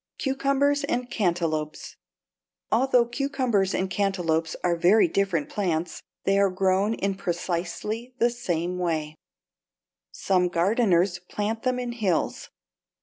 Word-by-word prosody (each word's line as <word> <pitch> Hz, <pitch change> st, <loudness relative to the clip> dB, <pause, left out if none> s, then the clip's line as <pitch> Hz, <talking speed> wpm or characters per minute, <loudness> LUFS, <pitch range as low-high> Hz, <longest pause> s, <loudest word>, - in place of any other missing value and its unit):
=Cucumbers 275 Hz, +1 st, +1 dB
and 245 Hz, -2 st, -2 dB
Cantaloupes.= 165 Hz, -6 st, -1 dB, 0.8 s
Although 250 Hz, +1 st, +4 dB
cucumbers 240 Hz, -6 st, 0 dB
and 190 Hz, -, 0 dB
cantaloupes 175 Hz, -4 st, 0 dB
are 175 Hz, -1 st, +2 dB
very 180 Hz, +5 st, +5 dB
different 175 Hz, -4 st, 0 dB
plants, 175 Hz, -4 st, -2 dB, 0.2 s
they 195 Hz, 0 st, +2 dB
are 200 Hz, -1 st, +4 dB
grown 190 Hz, +3 st, +1 dB
in 195 Hz, -2 st, -1 dB
precisely 190 Hz, +6 st, -3 dB
the 235 Hz, 0 st, +3 dB
same 180 Hz, -6 st, -2 dB
way. 160 Hz, -4 st, -1 dB, 1.0 s
Some 185 Hz, -2 st, +1 dB
gardeners 180 Hz, 0 st, +2 dB
plant 210 Hz, +5 st, -3 dB
them 255 Hz, -1 st, 0 dB
in 245 Hz, -1 st, -3 dB
hills. 205 Hz, -8 st, -1 dB
195 Hz, 115 wpm, -25 LUFS, 175-235 Hz, 1.0 s, very